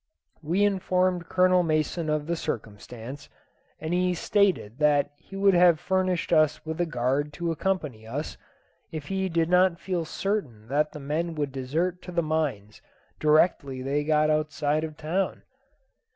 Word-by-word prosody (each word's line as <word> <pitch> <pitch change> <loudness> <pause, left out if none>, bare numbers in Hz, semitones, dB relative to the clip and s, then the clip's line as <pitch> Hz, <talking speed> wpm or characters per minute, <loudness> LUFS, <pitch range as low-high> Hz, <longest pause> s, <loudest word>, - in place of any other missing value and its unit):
We 175 +6 +2
informed 185 -3 +1
Colonel 185 0 +4
Mason 155 0 0
of 150 -1 0
the 170 +2 -1
circumstance, 120 +2 -6 0.5
and 160 +2 -3
he 180 0 +1
stated 175 - +1
that 145 -1 +3
he 195 - -13
would 195 0 +4
have 175 -2 +5
furnished 185 0 0
us 155 0 +3
with 160 +2 -3
a 175 - +1
guard 140 +1 0
to 170 +2 -2
accompany 150 - -2
us, 145 +7 -4 0.6
if 155 -3 -6
he 190 -1 -1
did 165 -1 +1
not 180 -1 +3
feel 180 -3 -2
certain 155 - -3
that 150 +2 +1
the 150 - -8
men 160 +4 -2
would 145 -2 -2
desert 160 +8 -2
to 180 - -9
the 170 -1 0
mines 145 -10 -2 0.4
directly 150 -4 +2
they 140 +2 0
got 155 0 +3
outside 150 0 0
the 160 - -3
town. 160 +5 -2
155 Hz, 155 wpm, -26 LUFS, 145-180 Hz, 0.6 s, have